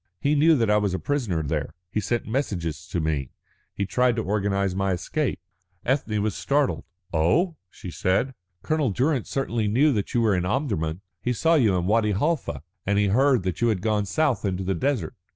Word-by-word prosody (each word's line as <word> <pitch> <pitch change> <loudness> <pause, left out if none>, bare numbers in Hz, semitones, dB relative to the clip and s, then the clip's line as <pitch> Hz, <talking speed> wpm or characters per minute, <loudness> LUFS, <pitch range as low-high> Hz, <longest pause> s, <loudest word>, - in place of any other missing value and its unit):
He 145 0 +1
knew 155 +2 +5
that 115 -6 +2
I 105 - +5
was 100 -3 0
a - - -2
prisoner 115 - -1
there. 75 +1 -3 0.2
He - - 0
sent 110 +4 -1
messages 95 - -3
to - - -2
me, 75 -5 -1 0.5
he 100 - -1
tried 125 +4 +2
to 110 - -1
organise 100 -1 0
my 95 0 0
escape." 125 - -2 0.5
Ethne 115 -6 0
was 105 -2 0
startled. 140 - 0 0.3
"Oh," 155 - +2
she 90 - -9
said, 95 +11 0 0.3
"Colonel 155 -4 +1
Durrance 130 +4 0
certainly 120 -5 -1
knew 135 +8 +3
that 105 0 -2
you 120 - +4
were 110 -3 +3
in 90 -1 +1
Omdurman. 90 - -1 0.2
He 125 - 0
saw 165 +7 +2
you 115 - +4
in 90 -1 0
Wadi 105 +1 +2
Halfa, 150 - -1 0.2
and 100 +1 +1
he 105 -1 +3
heard 130 +1 +3
that 95 +1 -3
you 120 - +4
had 105 -5 0
gone 105 -2 +1
south 150 -2 +1
into 95 -2 -1
the 95 +1 0
desert. 110 - -1
105 Hz, 200 wpm, -25 LUFS, 95-135 Hz, 0.5 s, knew